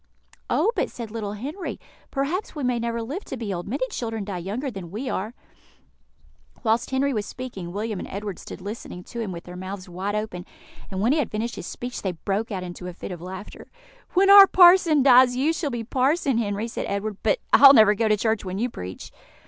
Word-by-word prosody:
"Oh, 450 - +2
but," - - 0
said 230 -3 -8
little 210 -2 -4
Henry, 290 - -6 0.3
"perhaps 305 +10 -2
we 295 - -4
may 250 -1 +1
never 235 0 -2
live 300 - -5
to 265 - -6
be 220 -4 -3
old; 175 0 -5
many 260 +4 -1
children 225 -3 -3
die 195 -3 -4
younger 220 +10 -4
than 190 -5 -8
we 230 +8 -4
are." 215 +6 -3 1.3
Whilst 230 +1 +1
Henry 270 +1 +1
was 210 -3 -2
speaking, 200 -9 -7
William 210 +1 -3
and - - -6
Edward 200 -1 -5
stood - - -9
listening 200 -3 -7
to 235 - -8
him 220 -4 -3
with 170 -1 -7
their 180 - -10
mouths 185 +1 -7
wide 190 +4 -3
open, 210 -4 -4 0.5
and 190 -1 -3
when 230 +5 +3
he 305 - +2
had 275 - -1
finished 225 +3 -3
his - - -7
speech 245 0 -6
they 190 -2 -2
broke 200 +7 -3
out 190 -2 -3
into 180 0 -7
a 180 - -6
fit 180 - -8
of 175 -2 -7
laughter. 185 +3 -9 0.5
"When 390 +2 +5
our 400 -1 +11
parson 350 -6 +6
dies, 250 -1 +6
you 285 +6 +1
shall 325 -3 -2
be 240 -3 -4
parson, 265 +2 +1
Henry," 205 0 -2
said 230 - -4
Edward; 200 +1 -3
"but 215 - +2 0.2
I'll 275 0 +9
never 215 -3 +7
go 220 +2 0
to 215 -1 +3
church 220 0 0
when 185 -1 -4
you 240 +3 -1
preach." 90 - -8
220 Hz, 220 wpm, -24 LUFS, 195-260 Hz, 1.3 s, our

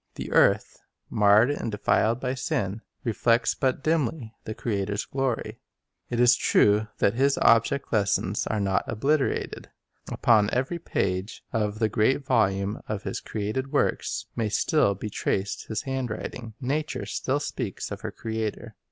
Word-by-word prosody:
The - - -6
earth, - - +3 0.3
marred 105 +5 +5
and 115 -5 -3
denied 110 +3 +1
by 125 0 -2
sin, 105 -5 -2 0.2
reflects 115 0 +2
but 135 0 -1
dimly 150 -7 0
the 110 - -5
Creator's 100 -2 -2
glory. 135 -3 -2 0.5
It 120 - -2
is 120 0 +6
true 105 -1 +3
that 100 - +2
His 135 +3 +2
object 115 +5 +3
lessons 100 -1 +1
are 110 - -1
not 95 -1 +1
obliterated. 135 +5 -1 0.4
Upon 105 -3 +4
every 130 +7 -1
page 95 - -2
of 105 -2 0
the 110 0 +2
great 120 +7 +1
volume 100 -5 +1
of 105 -1 -4
His - - -3
created 110 +6 -3
works - - 0
may 110 -2 0
still 105 -2 +2
be 105 +2 -6
traced 100 0 -2
His 110 -2 -3
handwriting. 125 -3 -4
Nature 145 +4 -2
still 135 +2 -1
speaks 145 - -4
of - - -6
her - - -4
Creator. 110 -1 -4
115 Hz, 145 wpm, -26 LUFS, 105-130 Hz, 0.5 s, is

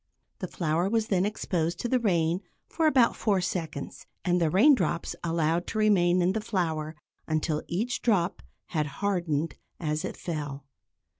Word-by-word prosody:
The - - -3
flour 170 +1 0
was 225 0 0
then 190 -1 +2
exposed 175 -5 -1
to - - -1
the 255 +1 +2
rain 175 -5 +1 0.3
for 325 -2 +1
about 260 -6 +4
four 205 -4 +1
seconds, 165 -5 -4 0.2
and 180 -1 +2
the 165 - +3
raindrops 190 - +3
allowed 165 0 0
to - - -4
remain 185 -4 +4
in 180 - +3
the 220 - -1
flour 160 -7 -2 0.3
until 155 -1 0
each 225 +8 -2
drop 195 -6 +1 0.3
had 155 -4 0
hardened 170 -6 0 0.3
as 150 -2 -1
it - - -5
fell. 145 -5 -5
175 Hz, 155 wpm, -28 LUFS, 160-205 Hz, 0.3 s, about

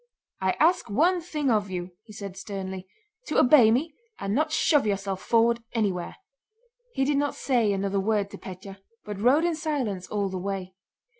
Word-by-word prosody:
"I 190 0 +2
ask 330 -5 +3
one 345 - +2
thing 300 -5 -1
of 210 -3 +1
you," 180 -1 -5
he 220 - -14
said 200 -3 -7
sternly, 190 -1 -6 0.4
"to - - -1
obey 250 -4 +7
me 285 +8 +1 0.3
and 195 0 -2
not 305 +5 +1
shove 295 -5 +3
yourself 195 -1 -2
forward 235 0 +2
anywhere." 195 -6 -1 0.8
He 270 - +1
did 285 0 +1
not 285 0 0
say 240 -6 +1
another 195 0 0
word 205 0 0
to - - -9
Pétya 190 +1 -9 0.3
but 205 -1 -6
rode 275 +8 +4
in 345 - +1
silence 280 - -2
all 205 -1 -1
the 185 -1 -4
way. 190 -1 -4
210 Hz, 175 wpm, -26 LUFS, 195-280 Hz, 0.8 s, obey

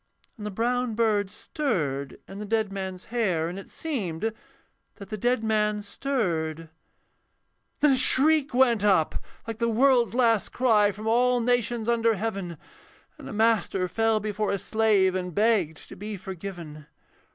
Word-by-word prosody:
And 210 -4 -7
the - - -3
brown 240 +3 -1
bird 210 -3 +1
stirred 155 - -3
in 195 +1 -9
the 210 - -5
dead 215 -1 0
man's 190 -2 -6
hair, 185 -9 0
And 180 +3 -6
it 195 - -12
seemed 220 - -3 0.6
that 200 - -11
the 215 - -3
dead 245 +2 0
man 210 -1 0
stirred. 165 - -2 1.1
Then 295 -1 +5
a 265 - +3
shriek 290 +3 +4
went 245 -4 +3
up 190 -7 +2 0.2
like 225 -1 -6
the 235 0 +1
world's 240 0 +3
last 230 -4 +2
cry 215 -5 +3
From 210 +2 -9
all 245 +2 +3
nations 240 -1 0
under 230 -1 +2
heaven, 195 -5 -4 0.6
And - - -9
a - - -7
master 215 -4 +1
fell 225 +4 +1
before 210 0 -2
a 200 - 0
slave 205 -2 +2
And 180 -2 -4
begged 205 -8 +1
to - - -10
be 205 +2 -6
forgiven. 175 -5 -8
215 Hz, 155 wpm, -26 LUFS, 190-235 Hz, 1.1 s, Then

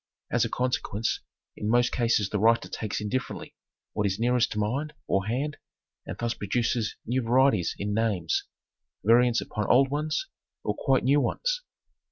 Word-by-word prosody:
As.a 120 -1 +2
consequence 115 -3 -1 0.4
in 105 - -3
most 120 +1 +3
cases 115 -5 +1
the 105 - 0
writer 115 +2 +3
takes 110 -2 -3
indifferently 105 +5 -3 0.4
what 105 -1 +1
is 95 0 -1
nearest 120 0 +2
to - - -6
mind 135 +9 -1
or 95 +1 0
hand 140 +6 -2 0.5
and - - -5
thus 120 0 -1
produces 115 +1 -1
new 125 +3 0
varieties 120 -5 +3
in 100 +1 -2
names, 105 -7 0 0.6
variants 120 +3 +4
upon 105 -1 -3
old 135 +2 +5
ones 150 +1 -1 0.4
or 105 - 0
quite 135 +3 +2
new 140 +3 +4
ones. - - -1
115 Hz, 155 wpm, -27 LUFS, 105-130 Hz, 0.6 s, old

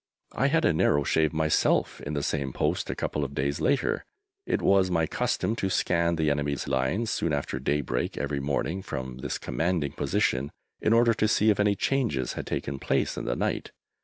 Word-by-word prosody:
I 135 - +2
had 160 +3 +2
a - - +4
narrow 75 -2 +3
shave 80 +2 +2
myself 80 0 +1
in 75 +1 -4
this 70 - -1
same 70 -4 -2
post - - -1
a - - -2
couple 75 - -2
of 70 0 -5
days 70 +1 -1
later. 140 -3 +1 0.4
It - - +1
was 95 -1 +3
my 85 -2 +2
custom 110 +7 -1
to 95 - -1
scan 85 -2 +1
the 80 -2 +1
enemy's 70 0 -1
lines 70 - 0
soon 80 - 0
after 70 -1 -2
daybreak 75 -2 -1
every 70 -1 -2
morning 75 +6 -1
from 65 -7 -5
this 65 - -3
commanding 80 -4 -1
position 65 +3 0 0.3
in 110 - +2
order 115 0 +5
to 110 0 +1
see 110 +1 +4
if 105 - -1
any 105 0 +3
changes 95 - 0
had - - -6
taken 70 -1 -3
place - - 0
in - - -5
the - - -1
night. - - -2
80 Hz, 195 wpm, -27 LUFS, 70-100 Hz, 0.4 s, order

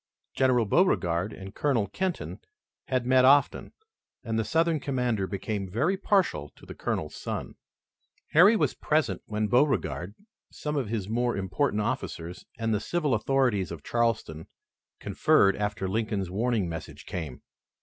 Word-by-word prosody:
General 130 -3 +3
Beauregard 100 - +2
and 95 -1 -9
Colonel 125 -8 +1
Kenton 185 - -3 0.5
had 130 -2 0
met 130 0 +4
often, 140 +2 +4 0.5
and 115 -2 -1
the - - +1
Southern 165 +5 +1
commander 125 -8 -1
became 100 0 -4
very 145 - +1
partial 190 - +1
to - - -16
the - - -8
Colonel's 75 - -3
son. - - -5 0.8
Harry 195 +8 +7
was - - +1
present 140 - 0
when 105 0 -1
Beauregard, 120 -6 +1 0.4
some 150 0 -4
of 130 -7 -1
his 105 -4 -2
more 120 +1 0
important 105 +4 0
officers 95 -8 -4
and 115 -1 0
the 105 - +1
civil 155 +3 -1
authorities 115 -4 +1
of 80 -4 -8
Charleston, 115 -9 -1 0.5
conferred 100 0 +3
after 105 -1 -2
Lincoln's 105 -2 -2
warning 110 -1 0
message 80 -1 -7
came. 80 -8 -6
115 Hz, 140 wpm, -27 LUFS, 95-135 Hz, 0.8 s, Harry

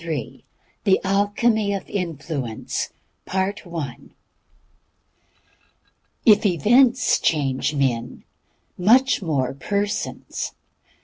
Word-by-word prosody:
THE 195 -2 +4
ALCHEMY 205 +2 +1
OF 195 - -4
INFLUENCE. 150 - -4 1.0
If 205 - -5
events 230 - +4
change 145 -1 0
men, 125 -4 -1 0.6
much 250 +8 +4
more 140 -7 -1
persons. 200 +9 -3
190 Hz, 60 wpm, -22 LUFS, 140-210 Hz, 1.0 s, THE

